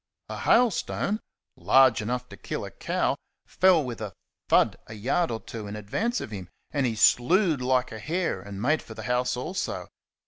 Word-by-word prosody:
A - - -5
hailstone, 220 -2 +2 0.4
large 130 -4 +5
enough 125 +3 -3
to - - -10
kill - - -5
a - - -8
cow, - - -1 0.3
fell 180 -4 +4
with 120 -4 -6
a 105 -4 -5 0.4
thud - - +4
a 110 - -8
yard 135 +11 0
or 115 -1 -3
two 110 -2 -8
in 100 - -6
advance 200 - -1
of - - -6
him, 95 -4 -7 0.2
and 140 -3 +1
he 115 - -2
slewed 155 - +4
like 125 0 +1
a 110 - -7
hare 165 - -1
and 100 0 -8
made 145 +8 +2
for 110 - -11
the 110 - -7
house 125 +2 0
also. 165 +10 -3
125 Hz, 185 wpm, -27 LUFS, 110-165 Hz, 0.4 s, large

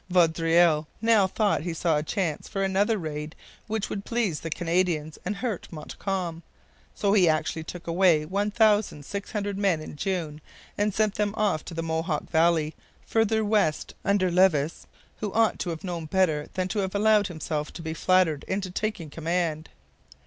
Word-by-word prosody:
Vaudreuil 165 -2 +3
now 225 -4 +4
thought 205 -1 +1
he 170 0 -4
saw 165 -1 +1
a 150 - +1
chance 165 -1 -2
for 195 - -2
another 200 +3 +2
raid 150 -3 -5 0.3
which 220 -1 -2
would 200 - -4
please 220 -10 -1
the 165 - -5
Canadians 165 -2 -1
and 200 +3 -2
hurt 220 -3 -3
Montcalm. 170 +1 -4 0.5
So 200 -1 +1
he 185 -5 +5
actually 155 +1 0
took 170 +2 -8
away 170 -3 +3
1,600 205 0 0
men 195 -5 +2
in 155 - -8
June 155 -2 -3 0.3
and 210 +1 +1
sent 215 0 +1
them 210 0 -1
off 205 -7 +1
to 170 - -7
the 165 - -2
Mohawk 160 -1 -2
valley, 160 -1 +3 0.3
farther 220 -1 +1
west, 205 -7 +1
under 195 -2 +2
Levis, 170 -4 +2 0.3
who 210 -2 -3
ought 225 0 +2
to 180 - -2
have 165 -1 -5
known 175 -3 -4
better 160 -4 +1
than 185 -1 0
to 210 - -1
have 190 0 -2
allowed 210 0 +4
himself 155 -3 -4
to 165 - -8
be 160 0 -3
flattered 170 -4 +2
into 190 -1 -2
taking 195 -6 -3
command. 165 -1 -2
180 Hz, 165 wpm, -26 LUFS, 160-205 Hz, 0.5 s, he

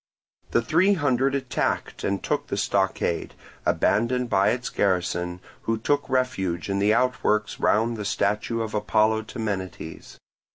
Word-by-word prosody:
The 115 - +2
three 180 - +3
hundred 135 -3 +1
attacked 130 -2 -2
and 100 0 -1
took 150 - -1
the - - -3
stockade, 95 -4 0 0.3
abandoned 120 +2 +1
by 100 0 +4
its 120 +2 -1
garrison, 90 -2 0 0.2
who 115 0 +1
took 145 +6 0
refuge 100 -9 -1
in 100 - 0
the 100 +2 +3
outworks 110 -3 +1
round 115 +2 +2
the 105 - -4
statue 105 +3 0
of 110 - -6
Apollo 110 +1 +2
Temenites. 95 -7 -5
110 Hz, 135 wpm, -25 LUFS, 100-125 Hz, 0.3 s, by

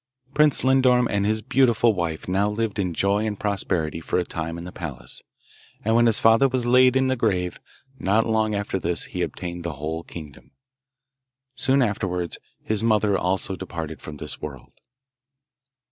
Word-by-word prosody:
Prince 150 -1 +3
Lindorm 130 -2 +4
and 100 0 +1
his 110 0 0
beautiful 120 -3 +3
wife 85 -4 -3
now 100 +3 +1
lived 105 -1 -2
in 90 -3 0
joy 100 +5 +1
and 105 -2 -3
prosperity 95 -6 -1
for - - -1
a 90 - +2
time 80 0 -4
in 85 - -7
the 90 - -8
palace; 70 -10 -4 0.6
and 110 - +2
when 120 0 +5
his 115 - +3
father 115 +4 +5
was 125 -1 -1
laid 125 +1 +5
in 130 0 +3
the 130 0 +1
grave, 95 -7 -1 0.4
not 105 +4 +2
long 110 -1 +1
after 100 -1 -2
this, 85 -2 -1
he - - -5
obtained 85 -1 -4
the 85 -2 -3
whole 80 +3 -4
kingdom. 75 -5 -11 1.0
Soon 135 0 +3
afterwards 90 -5 -2 0.2
his 110 0 0
mother 105 -3 +3
also 95 +1 -1
departed 85 -4 -6
from 75 -1 -8
this - - -6
world. 70 -4 -8
100 Hz, 170 wpm, -24 LUFS, 85-115 Hz, 1.0 s, when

